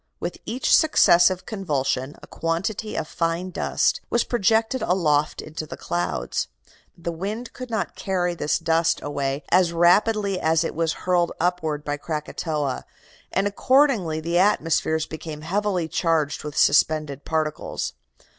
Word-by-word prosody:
With - - -4
each 255 +3 +3
successive 185 - +4
convulsion 145 - -2
a - - -8
quantity 195 +6 -3
of 155 - -2
fine 170 +3 -2
dust - - 0
was 240 - +2
projected 225 +2 +1
aloft 155 -5 +1
into 155 0 -6
the - - -8
clouds. 85 +1 -2 0.5
The 170 0 -4
wind 205 +8 -5
could 255 -1 -8
not 220 -3 -2
carry 180 -2 -1
this 150 -3 0
dust 165 0 +1
away 140 0 -2
as 180 -1 +4
rapidly 195 +3 +3
as 160 +1 +2
it - - -3
was 165 -1 0
hurled 175 -2 +2
upward 160 -4 -1
by 145 0 -2
Krakatoa, 150 -2 -3 0.5
and 195 - +1
accordingly 205 - +2
the 170 +2 0
atmosphere 165 -4 +2
became 155 -1 -7
heavily 185 0 -1
charged 160 -3 0
with 150 -1 -6
suspended 145 -1 +3
particles. 155 -1 -2
165 Hz, 135 wpm, -24 LUFS, 155-195 Hz, 0.5 s, successive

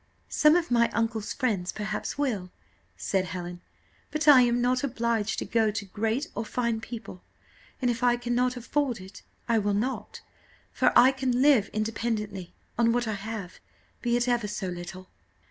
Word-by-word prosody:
"Some 300 +1 +5
of 345 -4 0
my 235 -1 +4
uncle's 225 -2 -1
friends 210 -9 -1
perhaps 210 +3 -4
will," 225 -11 -1 0.5
said 190 -2 0
Helen; 175 0 -6 0.5
"but 305 +1 -2
I 280 -4 +9
am 240 0 +3
not 250 +1 +1
obliged 235 -5 0
to - - -2
go 225 -2 +2
to 205 -1 -3
great 225 - -1
or 225 - -3
fine 235 0 -1
people, 220 -6 -8 0.6
and 245 - +3
if 230 0 -4
I 245 -1 +3
cannot 245 +1 0
afford 250 -1 -1
it 190 +1 -11 0.3
I 230 -2 +3
will 205 -1 0
not, 250 +6 -3 0.5
for - - +3
I 260 - +8
can 260 -1 0
live 275 -8 +5
independently 215 -4 -3 0.3
on 230 -1 +4
what 240 -1 0
I 220 - -1
have, 205 -2 -6 0.4
be 240 -1 +1
it 240 +1 0
ever 240 -3 +1
so 205 -2 -3
little." 180 +1 -7
230 Hz, 170 wpm, -27 LUFS, 205-245 Hz, 0.6 s, I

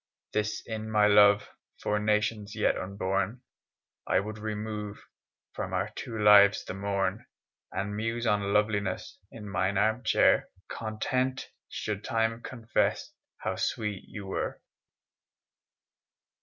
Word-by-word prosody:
Thus 105 0 -1
in 110 -1 -5
my 105 -1 +4
love 105 0 +6 0.3
For 105 0 0
nations 105 0 0
yet 105 - +2
unborn, 100 +4 -2 0.6
I - - +3
would 105 +2 -5
remove 105 -1 -5 0.5
From - - -4
our - - 0
two 115 - -5
lives 105 -1 +7
the - - -5
morn, 100 0 -1 0.4
And 100 +1 -3
muse 115 +2 -2
on 100 -2 +1
loveliness 100 -2 0
In 105 -2 -9
mine 100 0 0
armchair, 110 +3 +3 0.2
Content 130 +4 -2 0.2
should 105 -1 -4
Time 115 -1 0
confess 120 -3 -1 0.3
How - - -1
sweet 105 -3 -2
you 100 -3 -8
were. 95 - -3
105 Hz, 115 wpm, -29 LUFS, 100-110 Hz, 0.6 s, lives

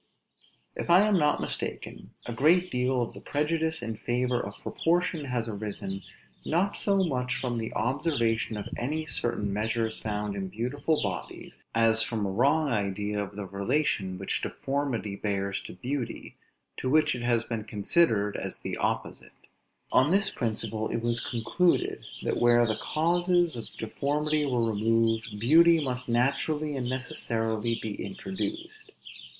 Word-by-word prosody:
If - - -4
I 175 +3 +8
am 210 -1 +3
not 150 -1 +2
mistaken, - - -4
a 120 - -4
great 175 +9 +3
deal 125 0 +1
of 115 - -6
the - - -10
prejudice 160 +2 -1
in 115 -1 -4
favor 125 +2 0
of 100 0 -7
proportion 170 -2 0
has 125 -3 -1
arisen, 100 -2 -4 0.4
not 185 +5 +1
so 195 -2 +2
much 125 -6 -1
from 125 -1 -2
the 115 -1 -3
observation 120 -3 0
of 105 - -5
any 155 +6 -2
certain 115 -8 -1
measures 110 +2 -1
found 105 -1 -3
in 95 -1 -3
beautiful 125 - -1
bodies, - - -5
as 115 0 +4
from 110 -2 -1
a 95 - -1
wrong 145 +8 +3
idea 105 -1 -1
of 100 0 -9
the 105 -1 -4
relation 100 -1 0
which 95 - -2
deformity 135 -7 -2
bears 100 -1 -2
to - - -8
beauty, 125 +4 -4 0.4
to 130 - -2
which 155 +2 +4
it 125 - -5
has 120 -1 +2
been 115 -2 -4
considered 105 - +2
as - - -4
the - - -5
opposite; - - -2 0.6
on 130 +3 +5
this 195 +3 +3
principle 110 -1 -2
it 115 - -2
was 120 0 +1
concluded 130 +10 +1 0.2
that - - 0
where 120 0 +6
the 110 -2 -1
causes 175 +1 +2
of 115 - -5
deformity 150 +6 0
were 120 -3 +1
removed, 115 0 +1
beauty 165 +8 +6
must 125 -4 -2
naturally 140 +5 +1
and 125 -2 -2
necessarily 115 -3 0
be 110 -2 -4
introduced. 330 - -5
120 Hz, 150 wpm, -28 LUFS, 110-150 Hz, 0.6 s, I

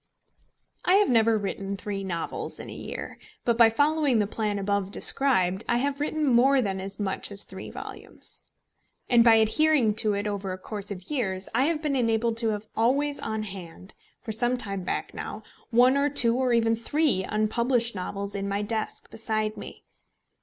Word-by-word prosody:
I 360 - +4
have 410 +1 +4
never 225 -1 +4
written 200 -1 -4
three 195 0 -4
novels 170 -3 -4
in - - -8
a - - -8
year, - - -7 0.3
but 235 - +3
by 230 -1 +7
following 290 +1 +2
the 210 - +2
plan 210 0 -2
above 200 -1 -1
described 200 -5 +2
I 235 - +3
have 275 +2 -1
written 305 +1 -1
more 265 +1 +4
than 195 -5 -1
as 195 +2 -7
much 200 0 -2
as 200 0 +3
three 190 0 -9
volumes; - - -6 0.7
and 235 -1 +7
by 230 -1 +7
adhering 230 +2 +3
to 215 -3 +2
it 200 +1 -2
over 200 -2 -3
a - - -6
course 205 +1 -7
of 190 +4 -7
years, 190 -9 -1
I 255 +4 +3
have 320 0 -1
been 290 -2 0
enabled 230 -2 +1
to 230 -1 +1
have 215 0 -3
always 280 +5 +1
on 220 -1 -3
hand, 185 -1 -9 0.3
for 220 - -4
some 240 +3 +1
time 195 -5 -2
back 180 - -3
now, - - -6 0.3
one 250 +3 +5
or 280 +1 +2
two 235 -5 +4
or 255 -1 +1
even 230 -1 +3
three 270 -2 0
unpublished 235 +4 0
novels 200 +1 -4
in 200 0 -3
my 200 +1 -1
desk 220 +1 -3
beside 215 -1 -2
me. - - -9
225 Hz, 185 wpm, -26 LUFS, 200-250 Hz, 0.7 s, by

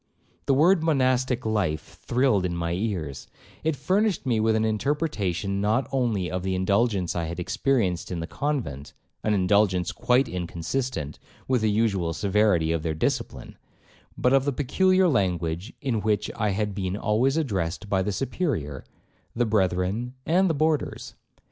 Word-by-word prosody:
The 135 - +4
word 170 +5 +5
'monastic 130 -5 +1
life' 100 -8 -2
thrilled 120 -6 +2
in 90 -1 -1
my 85 -1 -2
ears; 85 - -3 0.4
it 160 -1 +1
furnished 190 - 0
me 120 -4 +1
with 110 0 +2
an 110 0 +1
interpretation 105 - -1
not 110 +6 +1
only 115 -9 0
of 90 0 -2
the 95 0 -1
indulgence 100 0 +1
I 85 -1 -1
had 85 +2 -5
experienced 95 -3 0
in 90 - -3
the 80 - -3
convent, 110 - -3 0.3
(an 105 -1 +2
indulgence 95 -2 +2
quite 125 +1 +2
inconsistent 85 - -3 0.3
with 130 -3 +2
the 110 - +2
usual 100 -6 +1
severity 95 -3 +2
of 85 -1 0
their 80 -1 -2
discipline), 80 - -3 0.6
but 125 - +2
of 135 0 +4
the 145 - 0
peculiar 185 +8 +3
language 90 - 0
in 125 -7 -1
which 105 -1 0
I 105 - 0
had 105 +1 -1
been 95 0 -3
always 120 +7 +1
addressed 100 - -2
by 95 -1 +1
the 100 +2 -1
Superior, 100 - -2 0.5
the 120 +1 +2
brethren, 100 +3 0
and 185 +3 +3
the 160 - +1
boarders. 155 0 -1
105 Hz, 155 wpm, -25 LUFS, 90-130 Hz, 0.6 s, word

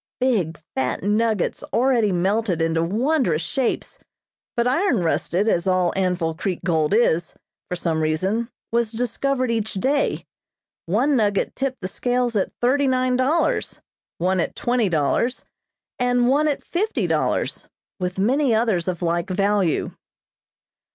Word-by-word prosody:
Big, 200 -12 0
fat 130 +4 -2
nuggets 215 0 0
already 235 -4 +2
melted 190 +1 0
into 165 0 +1
wondrous 205 - +1
shapes, 255 +9 -2 0.6
but 235 - +2
iron 270 - +2
rusted, 170 +5 0
as 175 -4 +1
all 185 -2 +2
Anvil 180 -4 0
Creek 180 +2 -3
gold 160 -4 +1
is, 175 -6 +2 0.3
for 180 - -2
some 165 -2 -1
reason, 190 +10 0 0.2
was 235 -1 +1
discovered 250 +2 -1
each 220 -2 -2
day. 270 +9 0 0.6
One 250 - +2
nugget 205 -4 +1
tipped 265 -3 -3
the 185 - -3
scales 245 +3 -1
at 200 - 0
thirty 270 +3 +3
nine 255 -1 +1
dollars, 275 +7 0 0.4
one 185 +2 +1
at - - -2
twenty 240 -4 +1
dollars, 170 - 0 0.5
and 245 -1 +2
one 290 +4 +3
at 290 - -1
fifty 420 +6 -1
dollars, - - -1 0.3
with 180 0 -3
many 250 +5 +2
others 220 -7 +1
of 180 -1 -2
like 170 +1 0
value. 195 -2 +1
210 Hz, 135 wpm, -22 LUFS, 175-250 Hz, 0.6 s, thirty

